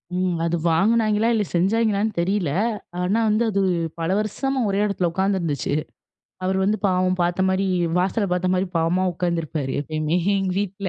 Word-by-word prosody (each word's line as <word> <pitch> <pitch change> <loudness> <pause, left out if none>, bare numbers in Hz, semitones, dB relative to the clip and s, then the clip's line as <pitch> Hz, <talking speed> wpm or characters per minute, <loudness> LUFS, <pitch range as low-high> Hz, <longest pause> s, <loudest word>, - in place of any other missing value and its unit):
ம். 180 -2 0
அது 170 +1 0
வாங்குனாய்ங்களா 215 +5 +2
இல்ல, 215 -2 +1
செஞ்சாய்ங்களான்னு 215 +3 +1
தெரியல. 185 -4 0 0.5
ஆனா, 190 +5 +1
வந்து 215 +2 +2
அது 200 -1 +1 0.4
பல 165 0 -1
வருஷமா 265 +6 -2
ஒரே 195 +1 0
இடத்துல 195 -4 0
உட்காந்துருந்துச்சு. 180 -8 -1 0.7
அவர் 190 +1 0
வந்து 210 +2 +1
பாவம் 185 -1 +1
பாத்த 175 +1 0
மாரி 190 +1 +1 0.3
வாசல 195 +4 +1
பாத்த 180 0 0
மாரி 185 +1 +1
பாவமா 165 +3 +1
உட்கார்ந்திருப்பாரு 165 -5 -2
எப்பயுமே 155 +2 -1 0.2
எங்க 195 -1 -1
வீட்ல. 195 0 -2
190 Hz, 150 wpm, -22 LUFS, 175-205 Hz, 0.7 s, வாங்குனாய்ங்களா